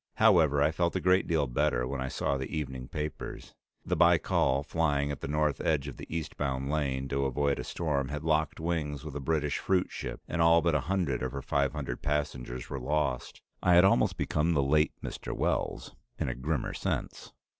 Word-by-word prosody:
However, 75 -4 +5
I 75 - +3
felt 85 +2 0
a - - +2
great 90 +1 +3
deal 80 -4 +2
better 60 -1 +1
when 70 0 -3
I 65 - -2
saw 70 +1 -1
the 65 -1 -3
evening 65 -5 -4
papers; 75 0 -6 0.3
the - - 0
Baikal, 80 -5 +3
flying 75 -4 0
at 70 - -6
the - - -4
north 75 -1 0
edge 75 -3 +1
of 70 - -7
the - - -9
eastbound 70 -4 -3
lane 65 -3 -1
to 70 0 0
avoid 70 +1 0
a - - -3
storm, 70 -5 -1
had 75 +1 -4
locked 80 0 +1
wings 80 -3 -2
with 75 -3 -7
a - - -2
British 75 0 0
fruitship 95 -1 -1
and 85 - -1
all 85 0 +5
but 85 -2 +2
a 75 - +3
hundred 90 -10 0
of 65 -1 -3
her 70 -1 -5
five 70 0 +1
hundred 75 -3 -4
passengers 65 -4 -2
were 70 - -4
lost. 65 -1 -2 0.2
I 90 -1 +5
had 90 +2 +7
almost 80 -10 +3
become 80 +2 +1
"the 70 -3 +2
late 75 +3 +3
Mr. - - -5
Wells" - - -1 0.2
in - - -2
a - - -1
grimmer 65 +2 -2
sense. - - -3
75 Hz, 200 wpm, -30 LUFS, 70-80 Hz, 0.3 s, had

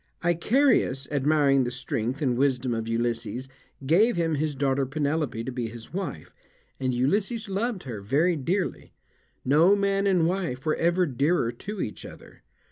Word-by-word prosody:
Icarius, 175 - +2
admiring 140 -1 +3
the 120 - -1
strength 125 +1 -3
and 125 -3 +1
wisdom 130 -2 +1
of 115 -1 -3
Ulysses, 115 +1 -2 0.4
gave 200 - +4
him 165 -2 0
his 150 0 -1
daughter 135 0 +1
Penelope 145 -3 -2
to 130 - -4
be 120 -2 -3
his 115 +4 -11
wife, 180 - -5 0.5
and 130 -1 0
Ulysses 195 - 0
loved 200 +1 -2
her 115 -6 -6
very 155 - +2
dearly, 175 +6 -2 0.5
no 160 +9 +5
man 200 0 +1
and 180 -4 +3
wife 170 -7 -2
were 155 - +2
ever 175 +2 +2
dearer 140 -2 +1
to 205 - -6
each 105 - -5
other. - - -13
145 Hz, 155 wpm, -26 LUFS, 125-180 Hz, 0.5 s, no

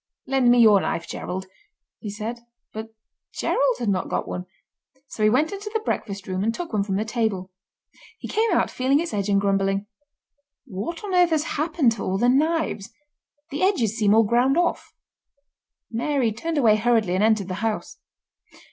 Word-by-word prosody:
"Lend 265 -2 +2
me 245 - +6
your 215 -4 +6
knife, 165 - -3
Gerald," 190 +1 -5 0.5
he 210 - -6
said. 220 +3 -5 0.3
But 220 +1 -5 0.5
Gerald - - +1
had 235 - -2
not 190 -2 -1
got - - -2
one, 180 0 -5 0.6
so 230 - -8
he 215 - +5
went 280 +8 +2
into 405 +1 -6
the 445 - 0
breakfast 200 - -4
room 185 0 -2
and 225 - +1
took 325 +4 -6
one 210 - +2
from 195 -1 -2
the 210 +3 -1
table. 215 -5 -2 0.7
He - - -8
came 445 +1 +1
out - - +2
feeling 265 +3 +2
its 335 -4 -3
edge 205 -1 -1
and 200 0 +3
grumbling. 195 0 0 0.8
"What 220 - -5
on 400 -2 -4
earth 355 -1 +5
has 315 -2 +1
happened 310 -4 +1
to 225 -3 -4
all 190 - -1
the 240 +4 +3
knives—the 295 0 -3
edges 260 - +2
seem 210 -2 +3
all 225 - +6
ground 245 +6 +2
off?" 350 0 0 1.0
Mary 245 0 0
turned 320 +9 -3
away 220 -6 +5
hurriedly 220 -4 +2
and 190 +3 +1
entered 215 -3 +2
the 185 - -4
house. 225 -1 -3
230 Hz, 180 wpm, -24 LUFS, 205-295 Hz, 1.0 s, me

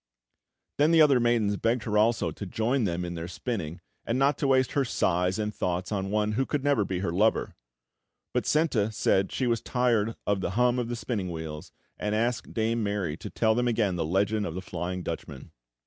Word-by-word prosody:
Then 150 +2 +5
the 165 -1 +6
other 140 -4 +5
maidens 115 -4 +2
begged 115 +3 0
her 105 - -2
also 110 +2 +2
to 100 - -7
join 115 +6 0
them 90 -1 -2
in 85 - -4
their 85 0 -5
spinning, 90 -3 -4 0.2
and 115 - -1
not 135 +2 +3
to 140 - +1
waste 130 -1 +3
her 140 - +2
sighs 90 -6 +1
and 105 -1 -2
thoughts 90 0 -2
on 95 -2 -2
one 105 +1 +1
who 120 +5 +1
could 145 -3 -1
never 145 -7 +3
be 95 -2 -3
her 95 - -1
lover; 105 +6 +1 0.8
but - - 0
Senta 135 -9 +2
said 95 -3 +1
she 130 - -1
was 115 -2 +1
tired 115 -3 +1
of 100 -2 +1
the - - -1
hum 125 0 +3
of 120 0 -3
spinning 105 -6 -3
wheels, 80 -2 -6 0.3
and 105 0 -1
asked 115 +2 -1
Dame 115 +1 0
Mary 100 -7 -1
to - - -7
tell 110 -1 +2
them 120 +2 +1
again 110 -5 +1
the 85 - -1
legend 100 +5 0
of 80 - -6
the 95 - -4
Flying 90 +1 -4
Dutchman. 80 -5 -6
105 Hz, 210 wpm, -27 LUFS, 90-120 Hz, 0.8 s, the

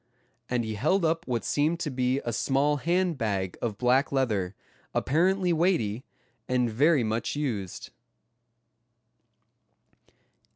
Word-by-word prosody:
and 120 -2 0
he 110 - -3
held 160 - +1
up 165 +1 0
what 120 -3 -2
seemed 155 +4 +1
to 155 -4 -3
be 130 +1 0
a 120 - -2
small 145 +5 +1
hand 170 +1 0
bag 100 -5 -1
of 110 -4 -2
black 125 +4 +2
leather, 105 -9 0 0.4
apparently 180 +4 +2
weighty, 145 - +1 0.4
and 125 -2 +1
very 145 +4 +3
much 110 +4 -2
used. 115 -11 -4
130 Hz, 120 wpm, -27 LUFS, 115-160 Hz, 0.4 s, very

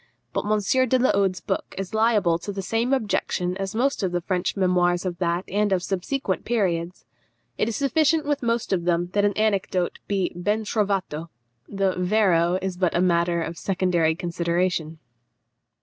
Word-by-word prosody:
But - - -1
M. 215 - +3 0.3
de 255 - +4
la 255 +1 +3
Hode's 195 -2 +1
book 190 - -3
is 195 +1 -5
liable 215 -7 +3
to 205 - -5
the 195 -1 -5
same 225 +6 0
objection 200 -7 0
as 195 +1 -4
most 270 +3 +1
of 190 -2 0
the 175 0 -1
French 180 +2 -1
memoirs 180 -1 +2
of 175 -2 -3
that 175 0 0
and 205 +1 0
of 185 -2 +1
subsequent 195 +3 -2
periods. 180 -6 -1 0.5
It 215 - +1
is 225 - -3
sufficient 305 +3 +2
with 290 -1 0
most 235 -3 0
of 175 -2 -1
them 175 0 0
that 205 0 +3
an 205 - +2
anecdote 195 -4 0
be 195 -3 0
ben 210 +5 -1
trovato; 195 -7 -1 0.4
the 195 -2 0
vero 180 -3 +3
is 190 -2 -3
but 180 -2 +1
matter 170 -1 +2
of 165 +1 -6
secondary 180 -4 +1
consideration. 170 -1 -1
190 Hz, 170 wpm, -24 LUFS, 175-210 Hz, 0.5 s, de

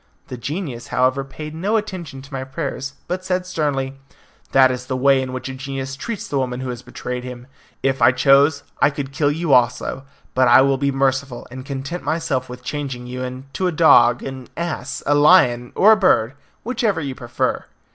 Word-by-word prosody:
The - - -5
genius, 135 - -5
however, 130 +2 +1
paid 150 +3 -8
no 195 +8 0
attention 175 -10 -6
to 140 +1 -14
my 130 -1 -3
prayers, 135 +1 -5
but 185 +1 -3
said 185 0 -1
sternly, 135 -6 -2 0.5
"That 130 -1 +6
is 125 0 -5
the 130 - -2
way 135 +1 +4
in 130 -1 -4
which 130 +1 -5
a 135 - -5
genius 135 0 -5
treats 220 +9 -5
the 140 - -1
woman 125 -1 -2
who 130 - -4
has 120 -1 -5
betrayed 125 0 -6
him. 125 -1 -8 0.4
If 135 -2 0
I 120 +2 +7
chose, 140 +3 +4 0.2
I - - +6
could 140 -2 -5
kill 145 +1 +1
you 160 -1 0
also; 125 +1 +2 0.3
but 130 0 +3
I 120 +2 +7
will 135 0 +2
be 140 0 +1
merciful, 135 -1 -1
and 130 +1 -7
content 140 +5 -5
myself 135 -6 -2
with 125 0 -9
changing 135 -4 -4
you 125 +1 -6
into 130 +7 -4
a - - 0
dog, 120 -7 +5
an 130 -2 -7
ass, 160 -5 -4
a 145 - +3
lion, 145 -6 +5
or 210 +3 +6
a - - +8
bird 135 - +3 0.3
whichever 220 -6 0
you 140 -4 -4
prefer." 120 -2 -2
135 Hz, 195 wpm, -20 LUFS, 130-150 Hz, 0.5 s, a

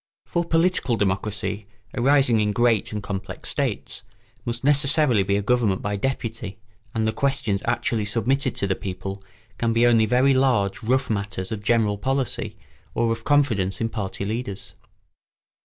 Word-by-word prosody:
For 170 - -1
political 165 -6 +2
democracy, 100 0 -2 0.3
arising 130 -2 +4
in 105 -1 +1
great 120 -1 +2
and 105 -1 -4
complex 95 -1 -5
states, - - -2 0.4
must 120 +1 -1
necessarily 140 -4 +4
be 100 +1 +1
a 100 - -2
government 110 -4 +1
by 105 0 -1
deputy, 115 -3 -3 0.4
and 110 0 +1
the 110 - +2
questions 115 -7 0
actually 115 -2 0
submitted 125 +6 0
to - - -1
the 95 - +1
people 95 +1 -6 0.4
can 115 -1 +1
be 115 +1 +4
only 115 -2 +4
very 130 +3 +4
large 125 -7 +2
rough 130 +2 +1
matters 100 -3 -3
of 110 -2 -3
general 105 -2 +1
policy 135 +2 -2 0.4
or 115 0 +1
of 115 0 -3
confidence 125 -10 +2
in 115 - -1
party 100 -3 -4
leaders. 100 -3 -5
115 Hz, 155 wpm, -24 LUFS, 100-130 Hz, 0.4 s, arising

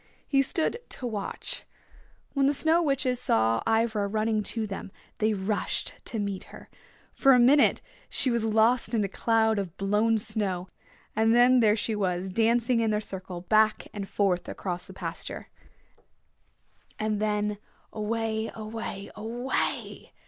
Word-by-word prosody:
He 275 -1 +3
stood 320 - 0
to 255 - -7
watch. 210 -4 -3 0.7
When 275 -1 +3
the 285 - +2
Snow 320 +4 +3
Witches 275 -5 0
saw 115 - +2
Ivra 225 -2 +1
running 215 +1 0
to 225 -2 -2
them 195 -1 -6 0.3
they 215 0 +2
rushed 200 +2 -2
to 230 - -4
meet 200 -2 -3
her. - - -13 0.4
For 270 -1 +5
a 250 - +6
minute 275 +4 +5 0.3
she 255 - +1
was 235 -1 0
lost 225 +2 +2
in 215 - +2
a - - 0
cloud 220 +1 +2
of 185 -3 -5
blown 210 +3 +2
snow, 205 -4 -2 0.5
and 225 +1 +3
then 250 +1 +6
there 215 -3 +4
she 220 0 -1
was 185 -2 -1
dancing 230 +3 +2
in 225 -1 +1
their 210 0 +1
circle 185 -3 -6
back 215 +3 +2
and 200 -2 -5
forth 185 -3 0
across 180 -2 -4
the - - -11
pasture, - - -6 1.5
and 215 -1 -1
then 210 -1 0 0.3
away, 220 0 -2
away, 215 -2 -6
away! 240 +4 -3
220 Hz, 150 wpm, -27 LUFS, 205-235 Hz, 1.5 s, a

